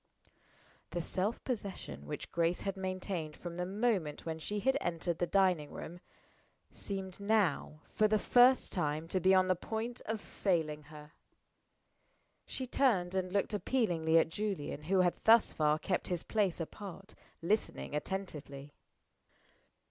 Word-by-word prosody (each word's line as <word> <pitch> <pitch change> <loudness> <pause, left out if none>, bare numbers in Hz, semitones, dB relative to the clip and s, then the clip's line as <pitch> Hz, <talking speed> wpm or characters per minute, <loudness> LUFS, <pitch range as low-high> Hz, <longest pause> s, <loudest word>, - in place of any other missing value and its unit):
'" - - -32
The - - +1
self 195 +6 -1
possession 205 -6 -5
which 150 - -6
Grace 170 +1 +1
had 195 -1 -2
maintained 185 -4 -3
from 175 -1 -7
the 180 0 -2
moment 195 -7 0
when 160 -1 -3
she 205 +6 -2
had 265 +5 +2
entered 170 0 -1
the 175 - +1
dining 180 -6 +2
room, 175 +2 -8 0.7
seemed 190 -2 -4
now, 200 -7 +1
for 215 - +4
the 215 0 +3
first 250 +4 +5
time, 155 -3 -1
to 185 - +1
be 190 +2 +5
on 185 0 +5
the 185 - +3
point 225 +6 -4
of 220 0 -1
failing 160 -8 -1
her. 150 0 -12 1.4
She 260 - -4
turned, 215 -9 +2
and 185 -1 -1
looked 200 +2 0
appealingly 175 -7 +2
at 160 - +4
Julian, 170 -6 -3
who 190 +2 +3
had 175 -1 +1
thus 225 0 +6
far 150 -1 +2
kept - - -1
his 175 -2 -2
place 200 -6 0
apart, 195 +4 -7 0.3
listening 210 -4 0
attentively. 150 -5 -5
185 Hz, 150 wpm, -33 LUFS, 160-205 Hz, 1.4 s, thus